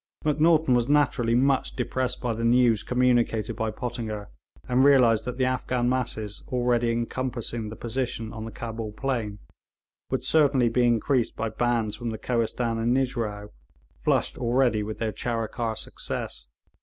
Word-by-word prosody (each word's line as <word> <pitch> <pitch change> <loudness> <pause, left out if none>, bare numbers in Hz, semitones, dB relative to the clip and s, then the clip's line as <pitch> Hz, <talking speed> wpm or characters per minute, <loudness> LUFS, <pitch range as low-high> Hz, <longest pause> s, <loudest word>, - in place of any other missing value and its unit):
Macnaghten 155 -1 +4
was 120 +1 +2
naturally 125 -5 +3
much 135 +1 +2
depressed 130 0 -2
by 120 -2 -1
the 115 +1 -4
news 120 -2 +4
communicated 120 -4 +1
by 110 - -1
Pottinger, 110 - -5 0.4
and 125 +1 +3
realised 125 -6 +5
that 125 0 -4
the 130 - +2
Afghan 125 -1 0
masses 115 -5 -2
already 120 -1 +1
encompassing 120 -1 -3
the 110 - -7
position 120 -2 -3
on 110 -1 -6
the 115 - -6
Cabul 115 -2 -5
plain 115 -5 -2 0.7
would - - -1
certainly 140 -6 +3
be 120 +1 +2
increased 120 +1 +1
by 115 - -2
bands 115 -1 0
from 120 -1 -4
the 110 - -4
Kohistan 115 0 -1
and 120 +3 +2
Nijrao, 115 -6 -2 0.5
flushed - - +1
already 120 -2 +2
with 105 +1 -5
their 110 -1 -1
Charikar 115 +1 -2
success. - - -4
120 Hz, 150 wpm, -26 LUFS, 110-125 Hz, 0.7 s, realised